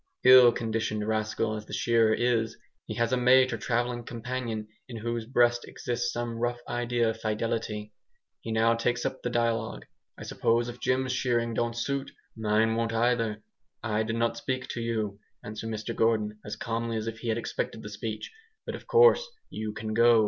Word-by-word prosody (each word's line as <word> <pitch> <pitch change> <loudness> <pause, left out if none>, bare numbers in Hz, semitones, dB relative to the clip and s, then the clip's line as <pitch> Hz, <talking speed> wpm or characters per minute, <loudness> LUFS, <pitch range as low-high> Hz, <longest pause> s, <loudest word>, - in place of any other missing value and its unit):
Ill 125 -1 +9
conditioned 110 -2 -2
rascal 110 0 0
as 105 0 -7
the - - -9
shearer 115 -2 +3
is, 115 -1 +1 0.3
he 110 - -4
has 115 +2 +1
a - - +3
mate 130 +1 +5
or - - -1
travelling 120 0 -1
companion 115 -2 -4 0.2
in 120 - -6
whose 115 0 -3
breast 120 -1 +3
exists 120 0 -2
some 120 -1 -3
rough 120 +1 0
idea 120 -1 0
of - - -10
fidelity. 105 -1 -2 0.5
He 115 - -5
now 110 +1 +4
takes 120 +1 0
up 130 0 -3
the 120 - -2
dialogue. 115 -2 -1 0.3
"I - - -8
suppose 115 +1 +1
if 120 0 -8
Jim's 130 0 +1
shearing 120 -2 0
don't 120 +1 -1
suit, 140 +3 -2 0.3
mine 110 0 +2
won't 115 0 -1
either." 115 -2 +1 0.4
"I 110 0 0
did 115 +1 -2
not 115 0 0
speak 130 0 -3
to 120 - -3
you," 110 -3 -2 0.2
answered 110 +1 -6
Mr 110 +1 -4
Gordon, 110 -2 +1
as 105 - -5
calmly 115 0 -2
as 110 - -3
if 115 0 -5
he 120 - -6
had 110 0 +1
expected 115 -1 -3
the 105 - -6
speech, 105 +1 -5 0.3
"but - - -4
of - - -9
course 475 0 +6 0.3
you 110 0 -4
can 110 0 -5
go." 115 0 +6
115 Hz, 185 wpm, -28 LUFS, 110-120 Hz, 0.5 s, Ill